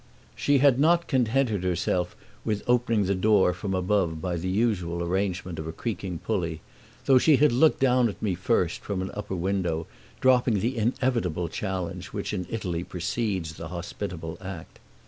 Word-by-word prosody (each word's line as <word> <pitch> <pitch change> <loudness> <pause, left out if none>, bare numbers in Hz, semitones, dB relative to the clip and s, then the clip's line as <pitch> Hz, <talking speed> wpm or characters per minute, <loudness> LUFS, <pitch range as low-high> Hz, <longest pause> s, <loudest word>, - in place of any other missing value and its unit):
She 145 0 +2
had 135 -1 +4
not 170 +3 +4
contented 125 - +1
herself 90 0 0 0.3
with 105 -1 -1
opening 115 -4 +2
the 100 - +1
door 95 -1 +3
from 95 +2 -3
above 90 -3 +1
by 90 +1 -2
the 90 +2 -3
usual 95 -5 0
arrangement 90 -1 -2
of 80 - -5
a - - -3
creaking 95 -2 -4
pulley, 85 -7 -1 0.4
though 130 -1 +6
she 155 +3 +5
had 150 0 +4
looked 145 +6 +4
down 125 -2 +4
at 100 - -8
me 105 -4 0
first 90 -1 0
from 95 -2 -3
an 95 - -5
upper 105 -2 -4
window, 90 -3 -1 0.3
dropping 125 -4 +4
the 120 +6 -1
inevitable 115 - 0
challenge 90 -2 -4
which 100 +1 -4
in 90 -3 -3
Italy 90 -6 -3
precedes 95 -2 -2
the 80 +1 -7
hospitable 85 -1 -6
act. 95 -4 -8
95 Hz, 165 wpm, -26 LUFS, 90-115 Hz, 0.4 s, though